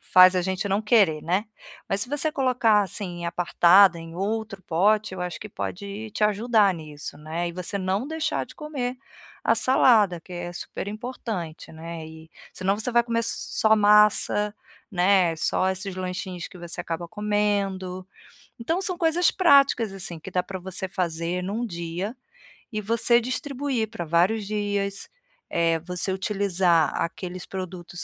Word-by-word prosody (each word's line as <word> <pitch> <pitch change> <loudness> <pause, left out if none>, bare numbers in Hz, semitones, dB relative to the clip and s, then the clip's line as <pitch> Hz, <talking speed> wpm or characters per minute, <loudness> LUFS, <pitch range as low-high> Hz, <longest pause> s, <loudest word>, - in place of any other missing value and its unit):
faz 185 0 +6
a 180 - +1
gente 190 +2 -2
não 200 +3 0
querer, 200 -9 +3
né? 185 +6 0 0.4
Mas 195 +1 +1
se 245 - -5
você 295 +2 +2
colocar, 250 -7 +3
assim, 175 -2 -5
apartada 175 +1 +5
em 165 0 -10
outro 200 +1 -3
pote, 205 +5 +1
eu 185 - -7
acho 180 -1 -5
que 210 - -7
pode 200 +3 -6
te 215 - -4
ajudar 210 -2 +3
nisso, 155 -2 -8
né, 165 +3 -3
e - - -6
você 180 +3 -2
não 190 +6 -1
deixar 320 0 -2
de - - -14
comer 270 -5 -4 0.5
a - - +3
salada, 215 -9 +4
que 180 - -14
é 175 0 -5
super 175 - -6
importante, 210 -8 -6
né, 165 0 -8
e 160 0 -13 0.2
senão 195 +2 0
você 250 +3 0
vai 235 - +5
comer 230 -1 -1
s 230 0 +2 0.3
só 220 0 +5
massa, 210 0 +4 0.4
né, 180 -2 +3
só 185 +3 +1
esses 190 0 -4
lanchinhos 180 -1 -5
que 180 - -14
você 175 0 -6
acaba 170 0 -5
comendo. 200 -3 -1 0.5
Então, 325 +11 -1
são 365 -2 +1
coisas 335 +1 +3
práticas, 275 - +4
assim, 175 -3 -3
que - - -10
dá 180 - 0
para 190 0 -7
você 190 +1 -4
fazer 175 0 -2
em 185 - -4
um 225 +4 -2
dia, 175 +5 -5 0.6
e 215 -1 -3
você 235 +3 +3
distribuir 255 -2 -2
para 220 -6 -5
vários 190 +6 +1
dias, 205 -1 -2 0.4
eh, 165 -1 +1
você 180 +2 -1
utilizar 190 -5 +1
aqueles 180 +1 -4
produtos 180 -2 -6
195 Hz, 165 wpm, -25 LUFS, 175-220 Hz, 0.6 s, faz